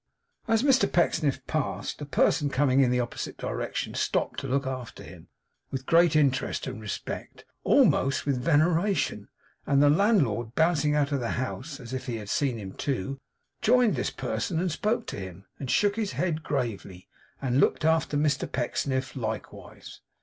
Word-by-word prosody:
As 225 Hz, +1 st, +2 dB
Mr 270 Hz, -3 st, +4 dB
Pecksniff 145 Hz, -6 st, +1 dB
passed, 155 Hz, -1 st, -3 dB
a 145 Hz, -, -5 dB
person 145 Hz, +2 st, +2 dB
coming 135 Hz, -1 st, +2 dB
in 130 Hz, -2 st, +5 dB
the 125 Hz, 0 st, +1 dB
opposite 120 Hz, -1 st, -4 dB
direction -, -, -3 dB
stopped -, -, -1 dB
to 135 Hz, -, -5 dB
look 135 Hz, +1 st, 0 dB
after 130 Hz, -2 st, -6 dB
him -, -, -13 dB, 0.4 s
with 135 Hz, -1 st, -5 dB
great 165 Hz, 0 st, +4 dB
interest 140 Hz, -4 st, +1 dB
and 125 Hz, -4 st, -6 dB
respect, 105 Hz, -2 st, -6 dB, 0.2 s
almost 135 Hz, +1 st, +3 dB
with 135 Hz, -3 st, 0 dB
veneration; 165 Hz, +4 st, +1 dB, 0.4 s
and 140 Hz, -, +3 dB
the 145 Hz, 0 st, +6 dB
landlord 140 Hz, -, +2 dB
bouncing 160 Hz, -2 st, +2 dB
out 145 Hz, -1 st, +1 dB
of 140 Hz, -, +1 dB
the 120 Hz, -2 st, -2 dB
house, 130 Hz, +3 st, -4 dB
as 125 Hz, -1 st, -9 dB
if 130 Hz, -, -4 dB
he 120 Hz, -, -2 dB
had 105 Hz, -3 st, -7 dB
seen 135 Hz, -5 st, 0 dB
him 95 Hz, -3 st, -7 dB
too, 135 Hz, 0 st, -3 dB, 0.4 s
joined 245 Hz, -1 st, +4 dB
this -, -, -1 dB
person, 165 Hz, -4 st, -2 dB
and 180 Hz, 0 st, 0 dB
spoke 215 Hz, +9 st, -1 dB
to -, -, -6 dB
him, 95 Hz, 0 st, -9 dB
and 135 Hz, -, -5 dB
shook 205 Hz, -, +2 dB
his 215 Hz, -3 st, -2 dB
head 165 Hz, -3 st, -1 dB
gravely, 110 Hz, -11 st, -4 dB, 0.3 s
and 130 Hz, -1 st, 0 dB
looked 145 Hz, -, +2 dB
after 160 Hz, -2 st, +2 dB
Mr 145 Hz, -2 st, 0 dB
Pecksniff 130 Hz, +1 st, -2 dB
likewise. 110 Hz, -4 st, -7 dB
140 Hz, 170 wpm, -27 LUFS, 125-160 Hz, 0.4 s, the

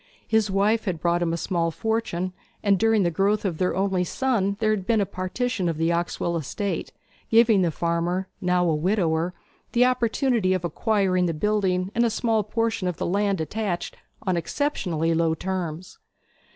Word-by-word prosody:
His 220 Hz, -2 st, +2 dB
wife 205 Hz, +3 st, +2 dB
had 180 Hz, -5 st, -2 dB
brought 170 Hz, +2 st, +1 dB
him 170 Hz, -1 st, +1 dB
a 170 Hz, -, -1 dB
small 170 Hz, -1 st, 0 dB
fortune, 185 Hz, -2 st, -2 dB, 0.3 s
and 200 Hz, -3 st, +3 dB
during 225 Hz, -2 st, +3 dB
the 175 Hz, -, +1 dB
growth 200 Hz, +5 st, +1 dB
of 175 Hz, -5 st, -2 dB
their 180 Hz, -1 st, +1 dB
only 190 Hz, -1 st, +1 dB
son 200 Hz, -1 st, 0 dB
there 215 Hz, -1 st, +2 dB
had 195 Hz, -3 st, -2 dB
been 230 Hz, -2 st, +3 dB
a 200 Hz, -, +2 dB
partition 185 Hz, +2 st, -2 dB
of 165 Hz, -, -2 dB
the 165 Hz, +1 st, +1 dB
Oxwell 170 Hz, 0 st, -1 dB
estate, 170 Hz, +4 st, -3 dB, 0.4 s
giving 225 Hz, -3 st, +5 dB
the 175 Hz, -, +2 dB
farmer, 170 Hz, +3 st, -1 dB
now 180 Hz, -1 st, +2 dB
a 165 Hz, -, +2 dB
widower, 170 Hz, 0 st, 0 dB, 0.4 s
the 245 Hz, +1 st, +5 dB
opportunity 240 Hz, -5 st, +1 dB
of 180 Hz, -2 st, -3 dB
acquiring 185 Hz, 0 st, +1 dB
the 165 Hz, -, -2 dB
building 190 Hz, 0 st, 0 dB
and 235 Hz, -, +2 dB
a 235 Hz, -, +3 dB
small 225 Hz, 0 st, +1 dB
portion 225 Hz, -1 st, -1 dB
of 180 Hz, -2 st, -2 dB
the -, -, -2 dB
land 200 Hz, +1 st, +1 dB
attached 180 Hz, +3 st, -3 dB, 0.3 s
on 185 Hz, -2 st, 0 dB
exceptionally 170 Hz, -, -1 dB
low 165 Hz, 0 st, +2 dB
terms. 180 Hz, -1 st, -4 dB
185 Hz, 180 wpm, -25 LUFS, 170-215 Hz, 0.4 s, giving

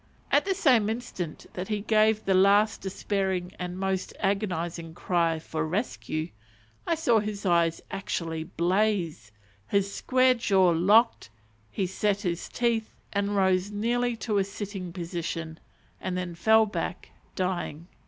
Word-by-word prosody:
At -, -, +4 dB
the 385 Hz, -1 st, 0 dB
same 250 Hz, -, +4 dB
instant 205 Hz, -8 st, -5 dB
that 180 Hz, +1 st, -4 dB
he 210 Hz, -1 st, -1 dB
gave 215 Hz, 0 st, +3 dB
the 195 Hz, -, +3 dB
last 200 Hz, +3 st, +4 dB
despairing 190 Hz, -2 st, -2 dB
and 180 Hz, 0 st, -4 dB
most 190 Hz, -1 st, -2 dB
agonizing 175 Hz, -5 st, -2 dB
cry 170 Hz, -2 st, +1 dB
for 155 Hz, 0 st, -4 dB
"rescue," 160 Hz, -2 st, -2 dB, 0.6 s
I 335 Hz, -, +2 dB
saw 240 Hz, -8 st, +3 dB
his 210 Hz, -1 st, -4 dB
eyes 170 Hz, -2 st, +2 dB
actually 165 Hz, -5 st, -3 dB
blaze, 175 Hz, -, 0 dB, 0.4 s
his 200 Hz, -, 0 dB
square 255 Hz, 0 st, +3 dB
jaw 195 Hz, -6 st, +3 dB
locked, 205 Hz, -, +3 dB, 0.4 s
he 190 Hz, -, -1 dB
set 200 Hz, +2 st, 0 dB
his 175 Hz, -3 st, -3 dB
teeth, 235 Hz, -2 st, -1 dB, 0.2 s
and 200 Hz, 0 st, 0 dB
rose 190 Hz, 0 st, +2 dB
nearly 235 Hz, +3 st, 0 dB
to 215 Hz, -2 st, -1 dB
a -, -, +3 dB
sitting 195 Hz, -2 st, -6 dB
position, 165 Hz, -2 st, -5 dB, 0.4 s
and 185 Hz, -1 st, -3 dB
then 180 Hz, -1 st, -3 dB
fell 220 Hz, +6 st, +4 dB
back 210 Hz, -, -5 dB, 0.2 s
dying. 175 Hz, -4 st, -3 dB
195 Hz, 140 wpm, -27 LUFS, 175-215 Hz, 0.6 s, At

